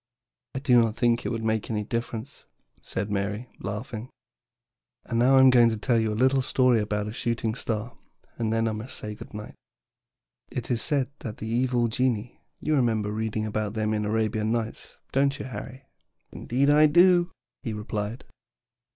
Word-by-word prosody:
"I - - -1
do 125 -4 +5
not 110 -1 0
think 120 -1 +1
it - - 0
would 115 -2 -3
make 110 -1 0
any 105 -2 -1
difference," 115 +3 -5 0.4
said 100 +2 -4
Mary, 105 +4 -2
laughing. 110 +3 -5 1.0
"And 115 - -1
now 130 +3 +5
I - - +8
am 130 -1 +8
going 120 -2 +6
to 110 - -2
tell 115 +2 +2
you 110 -1 +1
a - - -2
little 130 +2 +3
story 125 -2 +3
about 105 0 -1
a 105 - -5
shooting 115 -2 -1
star, 115 0 -4 0.4
and 110 -2 0
then 115 0 +1
I - - 0
must 110 +4 -6
say 105 0 -6
good - - -11
night. 105 0 -7 1.0
"It 125 0 -4
is 120 - +1
said 140 -4 0
that 110 -3 -6
the - - -6
evil 120 +1 +1
genii 120 -1 -1 0.2
you 155 - 0
remember 110 -6 +1
reading 110 0 -2
about 110 0 -2
them 110 0 0
in 105 - 0
the 105 - -2
Arabian 110 0 0
Nights, 115 -1 -4
don't 140 +1 +2
you, - - -6
Harry?" 130 +1 -8 0.5
"Indeed 135 +4 +1
I 150 +1 +7
do," 175 +2 +5 0.3
he 115 - -4
replied. 105 +2 -4
115 Hz, 185 wpm, -26 LUFS, 110-125 Hz, 1.0 s, I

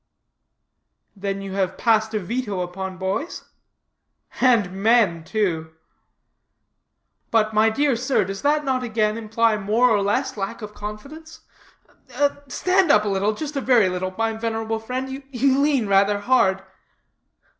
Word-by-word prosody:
"Then 195 0 -4
you 195 -1 -6
have 190 -2 -1
passed 220 -1 +1
a - - +1
veto 205 -1 -3
upon 185 +1 -5
boys?" 190 - -4 0.9
"And 230 -8 +3
men, 210 -7 +3
too." 160 -5 -2 1.5
"But, 220 -1 +2
my 215 +1 +4
dear 275 +3 +1
sir, 255 -2 0
does 195 +1 -6
not 295 +1 +2
that 260 -1 0
again 215 -3 0
imply 225 0 +1
more 220 +5 +2
or 205 -2 +3
less 255 +7 -1
lack 205 +3 -5
of 210 0 -8
confidence? 275 +12 -9 1.1
(Stand 365 +6 +1
up 210 -7 +5
a - - 0
little, 200 +2 0
just 300 +4 -6
a 275 - -1
very 240 -7 +4
little, 185 +1 -4
my 225 0 0
venerable 225 0 -3
friend; 260 +4 -5
you 270 +1 +1
lean 280 -5 +2
rather 200 +1 +3
hard.) 195 -5 +2
220 Hz, 140 wpm, -22 LUFS, 195-255 Hz, 1.5 s, up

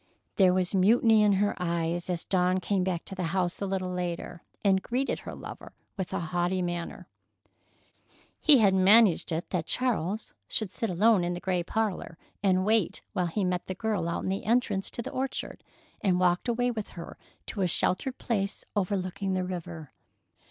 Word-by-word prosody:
There 190 -2 +6
was 185 0 0
mutiny 220 +3 +5
in 210 -1 +4
her 205 +2 +2
eyes 170 0 -1
as 175 -2 -1
Dawn 185 0 +2
came 190 0 0
back 180 -2 -2
to - - -8
the 190 - -5 0.2
house 180 0 -1
a 200 - -1
little 185 -1 -2
later, 175 -1 -4 0.2
and 190 -1 +4
greeted 255 +6 -1
her - - -8
lover - - -9 0.2
with 190 -3 -4
a - - -1
haughty 175 +2 -1
manner. 175 -1 -4 1.3
He 300 -3 +7
had 205 -5 +4
managed 190 -1 +5
it 165 +1 -3
that 170 -4 -1
Charles 220 -5 -1
should 215 -4 -2
sit 225 - -3
alone 195 +2 +4
in 175 0 -1
the 175 - -4
gray 180 -1 0
parlor 195 -3 -2 0.2
and 185 -1 +2
wait 215 -3 +1
while 180 -4 0
he 195 +5 -1
met 180 -1 -1
the 185 - -4
girl 200 -4 -1
out 170 - -2
in - - -2
the 195 +1 -2
entrance 220 -4 +1
to 235 - -6
the - - -6
orchard 265 +1 -4 0.4
and 185 -3 +2
walked 180 +4 +2
away 245 +1 +1
with 215 -3 -5
her 170 - -8 0.3
to 205 - -4
a 185 - +3
sheltered 185 +9 0
place 200 -5 -2
overlooking 195 -1 -1
the 185 - 0
river. 170 -5 -6
185 Hz, 185 wpm, -28 LUFS, 175-210 Hz, 1.3 s, He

